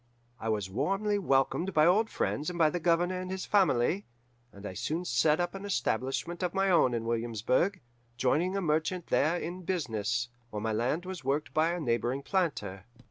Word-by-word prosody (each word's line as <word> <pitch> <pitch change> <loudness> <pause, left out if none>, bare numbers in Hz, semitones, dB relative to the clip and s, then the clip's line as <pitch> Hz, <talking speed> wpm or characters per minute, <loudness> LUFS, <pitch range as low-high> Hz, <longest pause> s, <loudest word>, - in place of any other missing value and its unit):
I 115 - -3
was 105 -3 0
warmly 195 - 0
welcomed 170 +3 +1
by 155 0 +6
old 210 +6 +4
friends 150 +4 -1
and 180 - -5
by 160 -2 +4
the 175 - -2
Governor 175 +2 +1
and 185 - -6
his 190 0 -4
family, 190 -2 +2 0.4
and 100 +1 -12
I 95 - -5
soon 160 - -3
set 150 +4 +3
up 175 0 -1
an 195 0 -7
establishment 170 - -1
of 180 0 -1
my 195 0 +2
own 130 -8 +4
in 115 -1 -3
Williamsburg, 115 - 0 0.4
joining 150 - +1
with - - -1
a - - 0
merchant 160 +2 0
there 160 +5 +2
in 175 +2 -5
business, 120 - -1 0.2
while 105 - -4
my 110 0 -1
land 130 +11 0
was 185 -5 -6
worked 140 +3 -1
by 160 +2 +3
a 175 - -3
neighbouring 125 -1 -1
planter. 105 - -1
160 Hz, 190 wpm, -30 LUFS, 120-180 Hz, 0.4 s, by